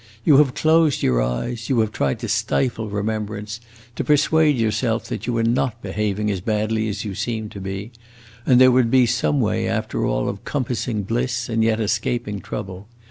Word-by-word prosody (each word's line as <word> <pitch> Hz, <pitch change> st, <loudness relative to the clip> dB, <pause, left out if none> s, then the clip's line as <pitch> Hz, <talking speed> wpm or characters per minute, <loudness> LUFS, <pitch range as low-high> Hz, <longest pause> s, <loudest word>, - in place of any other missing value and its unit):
You 145 Hz, -, +6 dB
have 140 Hz, -3 st, +4 dB
closed 160 Hz, -2 st, +3 dB
your -, -, +2 dB
eyes; 85 Hz, -, -3 dB
you 130 Hz, -4 st, +2 dB
have 110 Hz, -1 st, -1 dB
tried 70 Hz, -9 st, -1 dB
to -, -, -3 dB
stifle 115 Hz, -4 st, 0 dB
remembrance, 105 Hz, +1 st, -4 dB, 0.3 s
to -, -, -2 dB
persuade 150 Hz, +1 st, +3 dB
yourself 115 Hz, +1 st, 0 dB
that -, -, -5 dB
you 120 Hz, -, 0 dB
were 115 Hz, -1 st, +1 dB
not 120 Hz, 0 st, 0 dB
behaving 105 Hz, +1 st, -1 dB
as 95 Hz, -3 st, -3 dB
badly 110 Hz, +1 st, -1 dB
as 105 Hz, +2 st, -4 dB
you 100 Hz, -, -4 dB
seemed 110 Hz, +1 st, -3 dB
to 100 Hz, -, -8 dB
be, 95 Hz, +4 st, -5 dB, 0.5 s
and 125 Hz, 0 st, +4 dB
there 130 Hz, 0 st, +7 dB
would 125 Hz, -2 st, +3 dB
be 130 Hz, 0 st, +5 dB
some 75 Hz, -10 st, +1 dB
way, -, -, 0 dB
after -, -, -2 dB
all, -, -, 0 dB
of -, -, -5 dB
compassing 125 Hz, -5 st, -2 dB
bliss 120 Hz, +3 st, -2 dB
and 115 Hz, -1 st, +1 dB
yet 110 Hz, 0 st, +2 dB
escaping 105 Hz, -1 st, -1 dB
trouble. 95 Hz, +2 st, -7 dB
110 Hz, 190 wpm, -21 LUFS, 105-125 Hz, 0.5 s, there